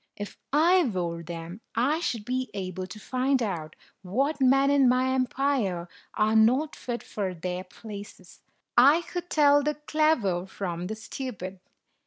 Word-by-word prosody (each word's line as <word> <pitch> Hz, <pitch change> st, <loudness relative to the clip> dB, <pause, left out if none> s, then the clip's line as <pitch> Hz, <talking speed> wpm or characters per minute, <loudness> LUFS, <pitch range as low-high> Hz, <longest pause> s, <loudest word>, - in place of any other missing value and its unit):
"If 205 Hz, 0 st, -7 dB, 0.2 s
I 345 Hz, +6 st, +5 dB
wore 175 Hz, -7 st, -2 dB
them, 170 Hz, +4 st, -7 dB
I 275 Hz, +8 st, +2 dB
should 230 Hz, -10 st, -2 dB
be 255 Hz, 0 st, -2 dB
able 185 Hz, -1 st, -4 dB
to 185 Hz, +4 st, -10 dB
find 255 Hz, +3 st, 0 dB
out 165 Hz, -7 st, -4 dB, 0.3 s
what 270 Hz, +11 st, -1 dB
men 270 Hz, +2 st, +5 dB
in 275 Hz, -3 st, +5 dB
my 255 Hz, +1 st, +2 dB
empire 255 Hz, -9 st, 0 dB, 0.3 s
are 215 Hz, +1 st, +2 dB
not 255 Hz, +8 st, +4 dB
fit 240 Hz, -1 st, -5 dB
for 190 Hz, -3 st, -4 dB
their 180 Hz, +2 st, -4 dB
places; 200 Hz, -2 st, -11 dB, 0.3 s
I 285 Hz, +8 st, +6 dB
could 355 Hz, 0 st, -6 dB
tell 290 Hz, -1 st, +5 dB
the 300 Hz, +1 st, -1 dB
clever 300 Hz, -, +1 dB
from 180 Hz, -3 st, -4 dB
the 220 Hz, -, -4 dB
stupid. 210 Hz, -5 st, -6 dB
235 Hz, 150 wpm, -27 LUFS, 185-275 Hz, 0.3 s, I